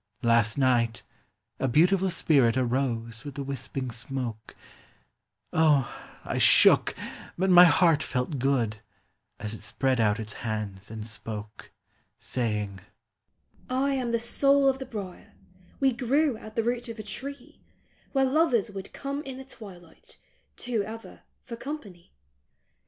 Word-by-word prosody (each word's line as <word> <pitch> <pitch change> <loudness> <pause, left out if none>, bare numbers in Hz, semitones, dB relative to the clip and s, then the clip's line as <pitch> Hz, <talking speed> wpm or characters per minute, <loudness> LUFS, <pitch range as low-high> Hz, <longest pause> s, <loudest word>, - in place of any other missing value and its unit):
Last 115 -1 +3
night 120 -3 +2 0.6
a 135 - +1
beautiful 180 +8 +3
spirit 135 -8 +3
arose 120 -3 -1
with 145 -2 -8
the 140 - -4
wisping 135 -1 -4
smoke; 120 -2 -5 1.0
O, 150 -5 +3 0.3
I - - -2
shook, - - +6 0.4
but 190 +1 +2
my 180 0 +10
heart 165 -1 +4
felt 125 +1 -2
good, 120 -5 +1 0.6
as 105 +1 -5
it 110 - -9
spread 130 -2 0
out 105 -1 +2
its 110 -1 -6
hands 105 -3 -4
and 110 -1 -6
spoke; 105 0 -7 0.5
Saying, 105 -5 -2 0.9
"I 265 +2 +1
am 255 -3 -1
the 230 - +2
soul 275 +4 +3
of 265 0 +2
the 265 - -6
brier; 200 -7 -8 0.5
we 270 -2 +3
grew 270 +3 +1
at 215 0 -11
the 230 - +1
root 240 +1 -1
of 230 - -7
a 215 - -6
tree 275 +8 -8 0.5
Where 270 -1 +3
lovers 260 - +2
would 195 -1 -8
come 280 +1 -4
in 265 -3 -8
the 265 - -9
twilight, 185 -10 -12 0.4
two 240 -3 -1
ever, 225 +3 -8 0.2
for 235 - -7
company. 215 - -8
160 Hz, 140 wpm, -27 LUFS, -, 1.0 s, my